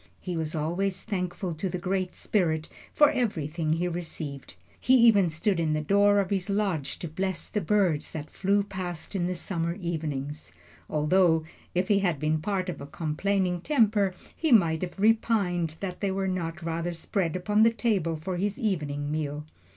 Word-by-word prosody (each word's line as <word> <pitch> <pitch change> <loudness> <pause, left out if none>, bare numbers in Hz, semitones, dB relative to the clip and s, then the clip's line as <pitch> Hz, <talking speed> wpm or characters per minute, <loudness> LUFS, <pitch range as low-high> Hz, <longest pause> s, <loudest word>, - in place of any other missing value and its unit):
He 180 -2 -4
was 160 -1 -2
always 180 +5 -1
thankful 180 -3 -3
to 175 +4 -3
the 180 - -3
Great 185 +1 -2
Spirit 160 -6 0 0.2
for 295 -1 +5
everything 165 - -1
he 170 +2 0
received. 160 -5 -6 0.2
He 260 - +4
even 225 -7 +6
stood 170 +4 0
in 160 -2 +1
the 155 - +1
door 200 +5 +4
of 195 -1 -1
his 195 0 -1
lodge 195 -8 -1
to 170 - -5
bless 185 +3 -3
the 210 - -2
birds 180 -5 +1
that 155 -1 -7
flew 200 +1 +1
past 185 -3 -6
in 175 -2 0
the 180 - -2
summer 170 -1 -2
evenings; 150 - -4 0.4
although, 160 +2 +3 0.3
if 180 +1 +1
he 205 -1 +4
had 175 -7 0
been 155 +1 0
of 185 -4 -2
a 140 - -7
complaining 180 +4 -1
temper, 210 - +2 0.2
he 320 -3 0
might 165 -8 +5
have 180 0 -5
repined 195 -6 +2
that 185 -2 -4
they 200 - +1
were 190 0 -1
not 175 -2 -3
rather 165 +1 -2
spread 170 0 -2
upon 205 +4 +2
the 225 - +7
table 205 -7 0
for 175 +4 -4
his 200 +2 -1
evening 150 -8 -1
meal. 150 -1 -3
180 Hz, 175 wpm, -27 LUFS, 160-200 Hz, 0.4 s, the